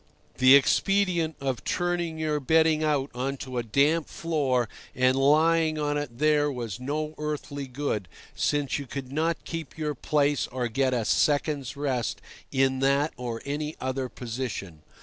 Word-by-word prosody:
The 130 +1 +8
expedient 170 +2 +2
of 135 -3 -2
turning 175 -2 -1
your 155 -1 0
bedding 160 +2 +3
out 145 -3 0
on 135 +3 -2
to 130 -1 -4
a - - +1
damp 145 +8 +2
floor 140 -7 0 0.3
and 130 +1 +3
lying 155 +3 +3
on 145 -1 0
it 145 -5 -4
there 150 0 +3
was 120 -6 -5
no 150 +4 -3
earthly 145 -2 -4
good, 125 -7 -3 0.3
since 145 -1 0
you 140 - -7
could 135 0 -6
not 160 +3 -1
keep 165 -4 -6
your 150 -1 -1
place 145 +1 +1
or 125 -1 -2
get 130 +2 +1
a 115 -3 -1
second's 145 -1 +1
rest 135 -4 -1 0.3
in 130 0 +2
that 140 +3 +2
or 120 -2 -5
any 150 +2 -3
other 130 0 -2
position. 115 -10 -5
140 Hz, 155 wpm, -27 LUFS, 130-155 Hz, 0.3 s, The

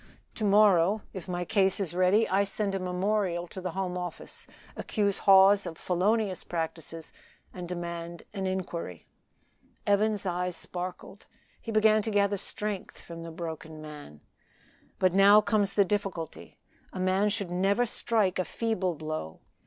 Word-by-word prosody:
To 220 - -5
morrow, 200 -1 +4
if 190 -2 -7
my 175 -1 -3
case 190 +1 +2
is 185 -4 0
ready, 185 +5 +3
I 195 +2 +2
send 200 0 -2
a 195 - -1
memorial 185 -1 -1
to 185 +2 -9
the 185 -2 -4
Home 180 -2 -2
Office, 175 -2 -6 0.3
accuse 200 -3 -1
Hawes 195 +1 +7
of 160 - -7
felonious 195 +2 0
practices, 165 -1 -5 0.4
and 180 -1 -7
demand 170 -1 -5
an 195 -2 -2
inquiry." 175 - -4 0.8
Evans's 205 0 +2
eye 180 0 -1
sparkled; 180 +3 -6 0.3
he 225 - -5
began 215 0 +4
to 220 - -3
gather 200 -1 +2
strength 205 0 -4
from 170 -1 -9
the 165 - -7
broken 160 -2 -7
man. 150 - -10 0.8
"But 185 -2 +2
now 200 +2 +7
comes 210 -2 +1
the 200 - +4
difficulty. 190 -5 -4 0.3
A - - -7
man 190 +3 +2
should 200 -4 -3
never 195 +6 +2
strike 215 -5 0
a - - +2
feeble 190 -5 -1
blow. 155 - -5
185 Hz, 150 wpm, -28 LUFS, 175-205 Hz, 0.8 s, Hawes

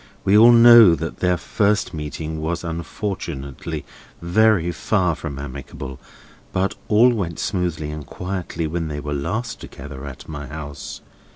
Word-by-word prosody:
We 100 - +3
all 115 +3 +9
know 115 -6 +9
that 80 +1 -5
their 90 -1 +2
first 105 +2 0
meeting 80 +1 -5
was 85 +3 -2
unfortunately 85 -4 -5 0.3
very 90 0 +3
far 90 +1 +1
from 75 -3 -6
amicable; 70 -1 -7 0.5
but 95 +1 0
all 115 +4 +5
went 90 -8 -3
smoothly 85 -5 -2
and 75 -1 -6
quietly 90 +1 -4
when 80 +1 -2
they 75 -1 -4
were 75 0 -4
last 110 - -3
together 65 0 -9
at 65 -3 -10
my 75 -2 -6
house. 75 -2 -7
85 Hz, 145 wpm, -22 LUFS, 75-100 Hz, 0.5 s, all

